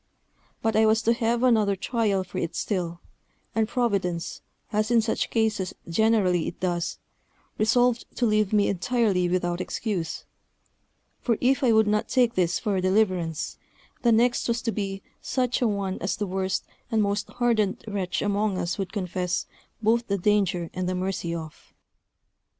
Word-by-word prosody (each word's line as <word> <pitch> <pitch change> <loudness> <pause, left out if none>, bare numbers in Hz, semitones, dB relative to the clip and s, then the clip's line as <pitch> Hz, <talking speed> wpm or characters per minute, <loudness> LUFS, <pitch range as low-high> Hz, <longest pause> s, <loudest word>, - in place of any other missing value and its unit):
But 225 -1 +1
I 220 0 +5
was 220 +1 +3
to 230 - +4
have 235 0 0
another 215 -5 +4
trial 205 -2 0
for 180 - -6
it 165 - -3
still; 175 -4 -2 0.5
and 220 -1 +1
Providence, 195 -9 -1 0.3
as 215 +1 +1
in 240 -1 +5
such 220 0 0
cases 220 -5 0
generally 190 -2 +2
it - - -6
does, 175 -2 -1 0.6
resolved 240 +2 +3
to 245 - +1
leave 215 -2 +2
me 210 -1 +3
entirely 195 -2 +1
without 175 0 0
excuse; 185 -5 -3 0.9
for 230 -3 0
if 270 +3 +2
I 245 - +5
would 220 -1 +5
not 210 0 0
take 245 -3 +3
this 175 -2 +1
for 210 -4 -1
a 185 - +1
deliverance, 185 -5 0 0.4
the 235 - +4
next 240 +2 +3
was 235 0 -1
to 230 - 0
be 195 -2 -4 0.2
such 250 -2 0
a 245 - +4
one 200 -3 -2
as 185 - -1
the 210 - -1
worst 190 0 -2 0.2
and 220 -3 +2
most 200 0 -1
hardened 230 -5 +1
wretch 190 -3 -2
among 205 -1 0
us 175 +3 -2
would 190 -2 -3
confess 180 -2 -2 0.4
both 230 +2 +2
the 200 - 0
danger 185 -3 +1
and 185 -1 -2
the 185 - -1
mercy 180 -2 -2
of. 160 -2 -9
205 Hz, 165 wpm, -26 LUFS, 185-225 Hz, 0.9 s, I